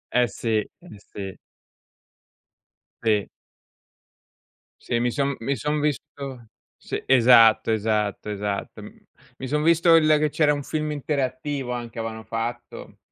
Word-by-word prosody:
Eh, 125 0 +4
sì. 110 +1 -2
Eh, 105 - -5 0.3
sì. 95 -1 -8 1.7
Sì. 105 -3 +1 1.5
Sì, 120 - -1
mi 120 +1 0
son 140 +1 -1
mi 135 +5 -1
son 150 +2 -1
visto 140 -4 -4 0.3
sì, - - -5
esatto, 115 -3 +6
esatto, 105 -1 -1
esatto. 100 -1 -4
M - - -9 0.5
mi 130 - -6
son 150 +3 0
visto 170 +1 +5
il 160 -1 +5
che 155 0 +1
c'era 150 0 +2
un 145 -1 -4
film 155 +1 -3
interattivo, 140 -2 -3
anche, 120 -1 -5
avevano 110 0 -5
fatto. 115 +2 -6
125 Hz, 130 wpm, -24 LUFS, 110-145 Hz, 1.7 s, esatto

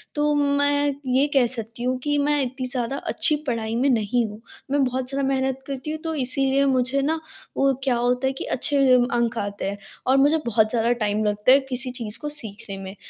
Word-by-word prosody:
तो 295 0 +2
मैं 285 0 +2 0.2
ये 270 +3 +3
कह 265 -3 +4
सकती 225 +2 -7
हूँ 255 +1 0
कि 290 -1 +1
मैं 290 0 +2
इतनी 255 0 -4
ज़्यादा 250 0 -3
अच्छी 305 - +2
पढ़ाई 225 -2 -2
में 265 +4 +2
नहीं 235 0 +1
हूँ। 210 +2 -10 0.3
मैं 285 -1 +3
बहुत 255 0 -1
ज़्यादा 275 -1 0
मेहनत 265 0 -1
करती 275 +2 -5
हूँ 315 - -4
तो 320 -1 -3
इसीलिए 270 +1 +1
मुझे 260 +1 +1
ना, 320 +3 0 0.4
वो 275 0 +3
क्या 255 -3 +2
होता 245 +2 +1
है 265 - 0
कि - - -4
अच्छे 285 +3 0 0.4
अंक 235 -1 0
आते 205 -1 -3
हैं, 200 - -5 0.3
और 265 +1 +4
मुझे 290 +4 +4
बहुत 220 -1 +2
ज़्यादा 235 0 +1
टाइम 210 +1 0
लगता 210 +4 +2
है 275 - +7
किसी 255 0 -1
चीज़ 230 -4 -4
को 295 - -4
सीखने 205 -7 -4
में। 190 +1 -8
260 Hz, 210 wpm, -23 LUFS, 235-280 Hz, 0.4 s, है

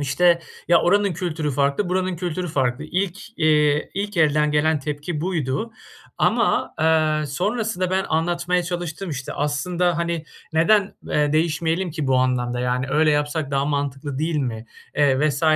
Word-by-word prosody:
işte: 170 +5 +3 0.3
"Ya, 170 - +6
oranın 200 +1 +3
kültürü 160 -3 -2
farklı, 140 +7 0
buranın 185 0 -1
kültürü 175 0 -3
farklı." 135 -1 -1
İlk, 190 +6 -4
eee, 150 -2 +3
ilk 205 0 -3
elden 150 -2 +3
gelen 150 +1 +2
tepki 150 +2 -4
buydu 170 - -2 0.5
ama, - - +1
eee, 155 -1 +2
sonrasında 185 - -1
ben 190 +1 +1
anlatmaya 175 +2 0
çalıştım 175 0 -4
işte. 140 -2 -5
"Aslında, 170 +4 0
hani, 170 -1 -2 0.3
neden, 200 +5 +3
eee, 150 0 +1
değişmeyelim 165 +3 0
ki 155 -3 -3
bu 130 - +3
anlamda 125 -1 0
yani, 125 +1 0
öyle 155 +2 +3
yapsak 145 0 -1
daha 140 0 +1
mantıklı 140 -1 -2
değil 160 0 -1
mi?" 120 -5 -3 0.3
eee, 145 0 +3
vs. 140 0 -3
155 Hz, 150 wpm, -22 LUFS, 145-175 Hz, 0.5 s, Ya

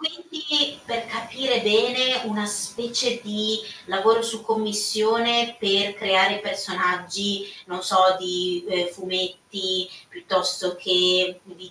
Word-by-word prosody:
Quindi 315 -3 -1
per 230 0 -4
capire 230 +3 -1
bene, 245 +4 +3
una 215 -2 -3
specie 235 +4 -2
di 215 0 -1 0.3
lavoro 205 +5 +3
su 230 -1 -4
commissione, 225 +2 +1
per 200 -1 +2
creare 195 -1 +3
personaggi 195 0 -2 0.2
non 180 0 -7
so 190 +1 +2 0.2
di, 180 -1 -3
ehm, 180 -1 0
fumetti, 185 +1 -3 0.2
piuttosto 185 - -2
che 180 0 +3
di 180 -1 -16
205 Hz, 110 wpm, -23 LUFS, 185-230 Hz, 0.3 s, bene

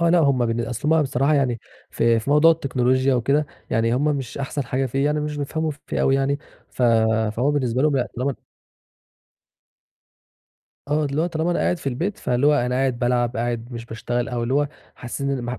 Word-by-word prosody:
آه 170 - +3
لأ، 175 - +5
هُم 140 -6 +3
بالن 115 0 -1
أصل 125 +7 0
هُم 160 - +4
بصراحة 140 +2 +1
يعني، 130 -5 +1 0.3
في 115 0 +2
في 115 +5 -3
موضوع 150 +3 +6
التكنولوجيا 130 -3 +1
وكده 140 +5 +1 0.2
يعني، 115 +1 +1
هُم 135 - 0
مش 140 -5 -2
أحسَن 140 0 -3
حاجة 130 +2 -1
فيه، 135 +3 -1
يعني 150 +1 +1
مش 150 0 -3
بيفهَموا 155 +2 -2 0.2
فيه - - -2
أوي 135 - +3
يعني، 135 +1 +1 0.3
ف - - -5 0.5
فهو 130 +5 +2
بالنسبة 130 -3 0
لهُم 150 -2 +3
لأ 125 -2 0
طالما 130 +3 -1 2.5
آه، 150 +1 +1
اللي 145 +2 -1
هو - - +1
طالما 165 0 -1
أنا 175 - 0
قاعد 175 - +1
في 140 - -3
البيت، 170 +11 -3
فاللي 125 +3 +1
هو 150 - +5
أنا 125 -3 0
قاعد 130 -1 0
بالعب، 120 0 0
قاعد 120 -1 -2
مش 115 -1 -7
باشتغل، 120 +2 -3
أو 120 -1 -2
اللي 120 +3 -1
هو 145 0 +2 0.3
حاسِّين 140 +3 -4
إن 125 -2 -3
135 Hz, 200 wpm, -22 LUFS, 120-145 Hz, 2.5 s, موضوع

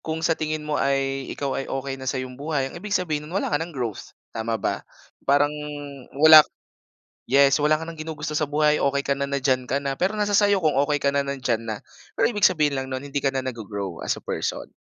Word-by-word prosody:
kung 160 0 -3
sa 165 0 +1
tingin 155 0 -2
mo 150 -1 -1
ay, 135 -1 0
ikaw 140 -2 -3
ay 135 - -2
okey 135 0 -3
na 130 - -9
sa 130 0 -1
'yong 125 -1 -7
buhay, 145 -2 -1
ang - - -11
ibig 205 +4 -6
sabihin 160 -6 0
no'n 155 - -10
wala - - -2
ka 145 - +1
nang 165 +3 -4
growth, 120 -8 -5 0.2
tama 115 0 -2
ba? - - -2 0.4
Parang 145 +1 +3 0.7
wala 155 0 +10
k - - -23 0.8
yes, 140 +2 +5
wala 150 +1 +4
ka 155 - -4
nang 165 -1 -8
ginugusto 155 -1 -5
sa 155 - 0
buhay. 150 +1 +2
Okey 140 0 +1
ka 140 - +1
na, 140 - -1
na 140 0 -2
diyan 130 -2 +1
ka 140 +3 0
na. 135 -1 -2
Pero 190 +4 +1
nasa 210 -1 0
sa'yo 205 -2 +4
kung 150 -4 +2
okey 145 +1 +2
ka 140 - +4
na, 140 0 0
na 140 - -2
diyan 120 -3 -1
na. 110 -1 -2 0.4
Pero - - +2
ibig 205 -3 +2
sabihin 150 -6 +1
lang 130 - -5
no'n, 130 0 -4
hindi 145 0 -4
ka 135 -1 0
na 130 - +1
naggo-grow 105 -7 -5
as - - -1
a - - -12
person, - - -3
140 Hz, 245 wpm, -24 LUFS, 135-155 Hz, 0.8 s, wala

